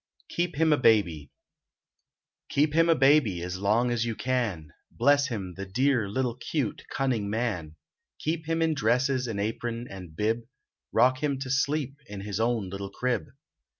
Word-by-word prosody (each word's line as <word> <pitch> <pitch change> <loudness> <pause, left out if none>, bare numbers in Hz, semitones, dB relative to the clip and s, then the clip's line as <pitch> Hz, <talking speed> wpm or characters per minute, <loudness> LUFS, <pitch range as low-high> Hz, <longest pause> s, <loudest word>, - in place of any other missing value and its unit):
KEEP 175 -2 -1
HIM 160 +1 +4
A - - +3
BABY 90 - +3 1.2
Keep 150 +1 +2
him 165 +1 +4
a 165 - +6
baby 135 - +4
as 90 +1 -4
long 110 +5 +2
as 120 -1 +1
you 115 -1 -2
can; 110 - -2 0.2
Bless 145 0 +3
him, 95 -7 -4
the 100 - -5
dear 120 +1 +1
little, 125 +3 -1
cute, 125 -1 -3
cunning 120 -7 -1
man! 100 -9 -2 0.4
Keep 160 0 -3
him 165 0 +1
in 160 -1 +2
dresses, 125 0 +1
and 110 -3 -3
apron, 115 +3 -3
and 90 -5 -10
bib; 110 +5 +1 0.5
Rock 130 +1 +3
him 145 -2 0
to 130 -1 -4
sleep 140 0 0
in 100 -1 -7
his 100 0 -4
own 115 -3 +1
little 100 0 -5
crib. 125 +4 -1
120 Hz, 165 wpm, -27 LUFS, 100-140 Hz, 1.2 s, a